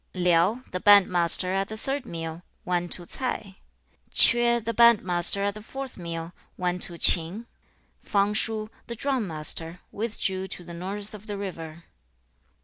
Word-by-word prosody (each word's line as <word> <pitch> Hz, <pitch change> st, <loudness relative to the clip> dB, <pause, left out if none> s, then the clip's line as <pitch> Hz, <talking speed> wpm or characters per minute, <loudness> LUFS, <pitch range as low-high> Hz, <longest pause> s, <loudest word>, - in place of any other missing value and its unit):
Liao, 180 Hz, +6 st, +1 dB
the 185 Hz, -, -3 dB
band 205 Hz, -1 st, +6 dB
master 180 Hz, +1 st, +2 dB
at 195 Hz, 0 st, -1 dB
the 220 Hz, -, -8 dB
third 270 Hz, +2 st, -4 dB
meal, 165 Hz, 0 st, -6 dB, 0.2 s
went 175 Hz, -1 st, -2 dB
to 175 Hz, -, -2 dB
Ts'ai. 200 Hz, -4 st, -5 dB, 0.5 s
Chueh, 235 Hz, 0 st, +7 dB
the 230 Hz, 0 st, -4 dB
band 235 Hz, -1 st, +5 dB
master 180 Hz, +2 st, +2 dB
at 200 Hz, 0 st, -1 dB
the 215 Hz, -, -10 dB
fourth 265 Hz, +4 st, -7 dB
meal, 170 Hz, -1 st, -7 dB, 0.2 s
went 180 Hz, 0 st, -2 dB
to 170 Hz, -, +1 dB
Ch'in. 175 Hz, +8 st, +3 dB, 0.6 s
3. -, -, -24 dB
Fang 200 Hz, 0 st, +1 dB
shu, 215 Hz, 0 st, -2 dB, 0.2 s
the 235 Hz, -, -6 dB
drum 260 Hz, -3 st, -1 dB
master, 165 Hz, +1 st, -2 dB
withdrew 195 Hz, -3 st, -3 dB
to 180 Hz, -, -5 dB
the 170 Hz, 0 st, -11 dB
north 200 Hz, +5 st, -7 dB
of 210 Hz, +1 st, -12 dB
the 205 Hz, -1 st, -5 dB
river. 170 Hz, -4 st, -8 dB
195 Hz, 165 wpm, -25 LUFS, 175-220 Hz, 0.6 s, Chueh